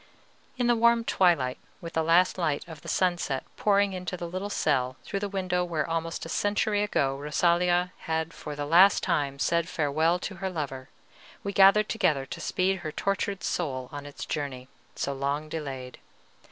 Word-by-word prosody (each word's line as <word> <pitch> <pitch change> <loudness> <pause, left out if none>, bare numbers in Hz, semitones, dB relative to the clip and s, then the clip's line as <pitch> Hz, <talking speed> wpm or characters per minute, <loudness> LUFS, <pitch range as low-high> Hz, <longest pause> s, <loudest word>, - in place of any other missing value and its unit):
In 250 - +1
the 240 0 +4
warm 235 0 +4
twilight, 165 - +2 0.2
with 170 0 -8
the 160 - +1
last 170 +4 +3
light 155 -4 -1
of 160 -3 -10
the - - -12
sunset 175 -7 0
pouring 200 -1 +2
into 180 0 -4
the 175 - -5
little 185 +4 -4
cell 130 -8 0
through 200 - -3
the 205 0 -3
window 185 -2 -1
where 165 -3 -2
almost 165 0 -3
a - - -6
century 205 +3 +1
ago 140 -10 +1
Rosalia 175 +5 +1
had 160 0 -1
for 150 -1 -7
the 145 0 -3
last 175 +6 +6
time 140 -2 0
said 170 +6 +1
farewell 160 +3 +1
to 190 +1 -6
her 190 +1 -3
lover, 140 -6 -5 0.5
we 200 - -3
gathered 200 +2 +6
together 150 -11 +1
to - - -7
speed 190 +1 0
her 155 -4 -5
tortured 195 +2 -2
soul 130 -7 -2
on 145 0 -7
its 145 - -7
journey, 135 -4 -4 0.3
so 140 - -2
long 140 +3 -2
delayed. 135 -5 -6
170 Hz, 180 wpm, -27 LUFS, 145-190 Hz, 0.5 s, last